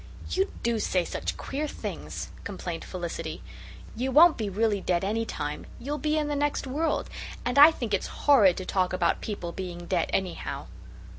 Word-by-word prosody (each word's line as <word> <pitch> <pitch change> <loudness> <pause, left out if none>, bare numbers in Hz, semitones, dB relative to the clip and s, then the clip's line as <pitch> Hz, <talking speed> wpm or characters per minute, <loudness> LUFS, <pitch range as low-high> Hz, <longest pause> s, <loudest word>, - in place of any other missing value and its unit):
"You 385 +2 +1
do 235 -1 +1
say 180 -4 +1
such - - -3
queer 295 +3 -3
things," - - -6
complained 180 -4 -5
Felicity. 165 -3 -5 0.5
"You 255 +4 -1
won't 320 +5 +8
be 215 -3 -2
really 205 0 +1
dead 175 -1 +1
any 220 +3 0
time. 150 -7 -4
You'll 290 +4 -4
be 305 0 +1
in 300 -1 +1
the 295 - -1
next 290 0 0
world. 295 +5 0 0.4
And 250 +3 +2
I 295 +2 +11
think 240 -9 -4
it's 200 - +1 0.2
horrid 215 -11 +6
to 185 - -4
talk 185 -1 +1
about 185 - +1
people 190 -5 -4
being 175 -1 -6
dead 170 -2 0
anyhow." 185 -2 -2
215 Hz, 175 wpm, -27 LUFS, 180-285 Hz, 0.5 s, I